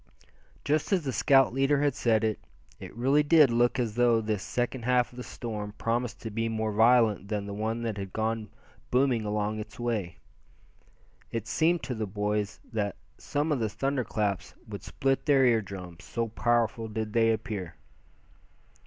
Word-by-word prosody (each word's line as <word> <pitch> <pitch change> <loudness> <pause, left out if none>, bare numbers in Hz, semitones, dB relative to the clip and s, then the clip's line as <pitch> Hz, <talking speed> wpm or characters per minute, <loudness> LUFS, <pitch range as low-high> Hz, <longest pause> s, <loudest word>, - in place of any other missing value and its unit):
Just 150 +5 0
as 185 -4 +2
the 135 -3 -2
scout 135 -2 +4
leader 135 +2 +2
had 145 -2 +2
said 115 -4 +1
it, 110 -1 0 0.4
it - - -8
really 135 +5 +3
did 150 -3 +5
look 120 +2 +2
as 120 -4 -1
though 120 0 +3
this 105 -3 -2
second 125 +3 -2
half 125 0 +2
of - - -14
the - - -5
storm 105 -4 -6
promised 115 +1 -2
to 110 - -5
be 115 +2 -1
more 110 -1 -1
violent 110 -2 +4
than 105 -1 -2
the 100 - -6
one 110 +3 -2
that 110 -3 -3
had 95 -1 -5
gone 110 0 -2 0.4
booming 125 -3 +2
along 105 +1 -1
its 105 +1 -9
way. 105 -8 -2 1.1
It 115 -1 -4
seemed 170 +4 +2
to 130 - -3
the 110 -2 -3
boys 105 +1 -2
that 105 -3 -1 0.2
some 145 +2 -1
of 145 - +1
the 110 -2 0
thunder 135 +5 -1
claps 105 -5 -2
would - - -7
split 135 +2 -1
their 135 -3 +5
ear 115 -3 +4
drums, 90 -4 -9
so 115 -1 -3
powerful 115 0 +1
did 110 0 -4
they 115 -1 +4
appear. 100 -6 -4
115 Hz, 180 wpm, -28 LUFS, 105-125 Hz, 1.1 s, did